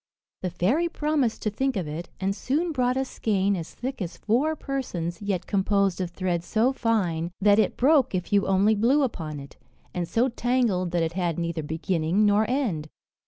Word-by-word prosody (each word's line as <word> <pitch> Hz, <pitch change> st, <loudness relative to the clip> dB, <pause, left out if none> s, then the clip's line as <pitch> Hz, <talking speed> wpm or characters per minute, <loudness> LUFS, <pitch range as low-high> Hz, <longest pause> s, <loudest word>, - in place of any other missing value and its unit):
The 185 Hz, -, -1 dB
fairy 225 Hz, -, +1 dB
promised 300 Hz, -8 st, 0 dB
to 215 Hz, -, 0 dB
think 265 Hz, +2 st, -1 dB
of 180 Hz, -5 st, -2 dB
it, 155 Hz, +4 st, -6 dB
and 195 Hz, +1 st, -1 dB
soon 310 Hz, +10 st, -1 dB
brought 255 Hz, -3 st, +1 dB
a 265 Hz, -, 0 dB
skein 200 Hz, -5 st, 0 dB
as 165 Hz, -3 st, -7 dB
thick 260 Hz, -2 st, -5 dB
as 175 Hz, -2 st, -4 dB
four 270 Hz, +9 st, +1 dB
persons, 185 Hz, -, -4 dB
yet 200 Hz, -3 st, -2 dB
composed 200 Hz, -1 st, +1 dB
of 180 Hz, -, -2 dB
thread 175 Hz, -1 st, -2 dB
so 230 Hz, +7 st, +1 dB
fine, 180 Hz, -10 st, 0 dB
that 205 Hz, +1 st, +5 dB
it -, -, +1 dB
broke 265 Hz, -4 st, +4 dB
if 180 Hz, +2 st, -3 dB
you 200 Hz, -1 st, +3 dB
only 195 Hz, +3 st, +4 dB
blew 245 Hz, +8 st, +3 dB
upon 160 Hz, -, -3 dB
it, 140 Hz, 0 st, -12 dB, 0.4 s
and 175 Hz, -2 st, -2 dB
so 235 Hz, +7 st, +2 dB
tangled 235 Hz, -7 st, 0 dB
that 170 Hz, -1 st, 0 dB
it 165 Hz, 0 st, -2 dB
had 175 Hz, -2 st, -1 dB
neither 170 Hz, -1 st, -2 dB
beginning 165 Hz, +5 st, 0 dB
nor 210 Hz, +2 st, +3 dB
end. 210 Hz, -, -1 dB
200 Hz, 190 wpm, -26 LUFS, 175-250 Hz, 0.4 s, that